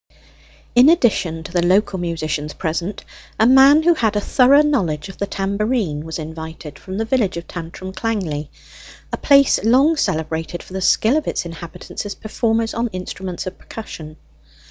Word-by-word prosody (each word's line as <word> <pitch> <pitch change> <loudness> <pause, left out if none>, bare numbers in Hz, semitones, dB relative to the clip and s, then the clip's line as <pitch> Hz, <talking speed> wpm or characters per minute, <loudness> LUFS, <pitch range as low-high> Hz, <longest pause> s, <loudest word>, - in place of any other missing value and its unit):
In 250 +4 +7
addition 195 - +2
to - - -9
the 175 -1 +1
local 190 +2 +2
musicians 155 -3 -3
present, 170 +3 -3 0.3
a 220 - +5
man 270 +5 +7
who 345 +1 +5
had 225 -9 0
a - - +2
thorough 270 +7 +4
knowledge 190 - -1
of 190 - -12
the 200 - -1
tambourine 200 - -1
was 160 -1 -5
invited 160 -1 -8
from 190 0 -7
the 225 - -1
village 225 -6 0
of 170 - -6
Tantrum 180 +2 -7
Clangley, 185 -9 -3 0.6
a - - 0
place 275 -7 +4
long 265 +8 +4
celebrated 160 - -2
for - - -14
the 190 - -3
skill 220 +8 +3
of 310 - -3
its - - -2
inhabitants 170 0 -8
as 205 -1 -6
performers 225 +1 -1
on 235 +2 -1
instruments 185 -2 -6
of 185 0 -7
percussion. 155 -8 -9
190 Hz, 165 wpm, -20 LUFS, 165-230 Hz, 0.6 s, In